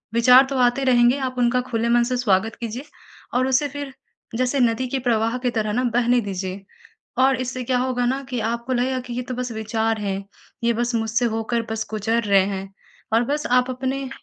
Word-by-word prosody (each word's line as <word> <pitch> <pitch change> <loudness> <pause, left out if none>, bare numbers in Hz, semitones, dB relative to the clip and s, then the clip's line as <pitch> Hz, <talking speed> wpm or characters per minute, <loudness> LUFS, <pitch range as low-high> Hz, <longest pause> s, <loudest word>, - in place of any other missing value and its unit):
विचार 250 +3 +7
तो 275 - -2
आते 245 +2 +2
रहेंगे 245 0 +4
आप 255 - -7
उनका 245 +1 +2
खुले 230 0 0
मन 240 0 +4
से 250 +1 -1
स्वागत 220 -2 +1
कीजिए 235 +4 -5 0.5
और 255 +1 +2
उसे 265 +2 +2
फिर 285 -1 -7 0.4
जैसे 255 +2 +1
नदी 240 +2 +1
के 270 - -1
प्रवाह 230 +1 +1
की 250 0 0
तरह 215 -1 0
न 250 +2 +1
बहने 240 +1 +2
दीजिए 190 -1 -5 0.6
और 265 0 +4
इससे 255 0 -4
क्या 250 +1 +1
होगा 250 -1 0
न 265 +3 -1
कि 250 -2 -2
आपको 235 +2 -4
लगेगा 255 +1 0
कि 240 - -4
ये 250 - -2
तो - - -1
बस 250 -1 -4
विचार 220 0 -1
हैं। 195 -1 -3 0.4
ये 235 - +3
बस 240 +1 -1
मुझसे 225 +2 0
होकर 230 +1 -1
बस 220 0 -2
गुज़र 220 +2 0
रहे 200 -2 +4
हैं 195 -1 -4 0.5
और 230 +2 +4
बस 295 +4 -2
आप 250 +1 0
अपने 265 +1 -3
240 Hz, 205 wpm, -22 LUFS, 225-255 Hz, 0.6 s, विचार